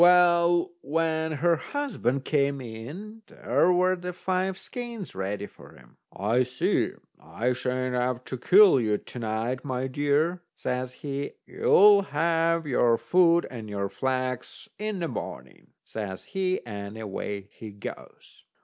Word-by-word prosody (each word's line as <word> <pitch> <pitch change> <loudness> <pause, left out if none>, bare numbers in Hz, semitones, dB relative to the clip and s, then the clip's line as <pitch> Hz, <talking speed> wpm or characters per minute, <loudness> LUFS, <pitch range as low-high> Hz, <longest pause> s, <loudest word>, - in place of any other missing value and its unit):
Well, 175 0 +5
when 160 +1 0
her 170 +2 +2
husband 185 - -2
came 140 -2 +1
in, 145 - -8
there 180 - +1
were 185 +1 +3
the 180 0 -6
five 185 +1 -1
skeins 235 -5 -7
ready 100 +2 -3
for - - -15
him. - - -20
"I 110 +5 +1
see 125 0 0 0.3
I 125 +2 -1
sha'n't 130 0 -2
have 125 0 -1
to 130 - -6
kill 185 - +7
you 105 -2 +1
to 125 - -10
night, 115 +3 -2
my 130 -2 -2
dear," 145 +6 +1
says 125 0 -3
he; 140 0 -3
"you'll 205 0 +6
have 165 0 +1
your 120 -4 +3
food 170 +1 +4
and 110 -4 -7
your 100 -1 -2
flax 130 0 -3
in 215 -1 -2
the 170 -2 -2
morning," 65 - -7 0.2
says 100 -4 -6
he, 185 -4 -2
and 100 -1 -6
away 100 -1 -5
he 110 - -9
goes. 100 -1 -10
140 Hz, 140 wpm, -27 LUFS, 120-175 Hz, 0.3 s, kill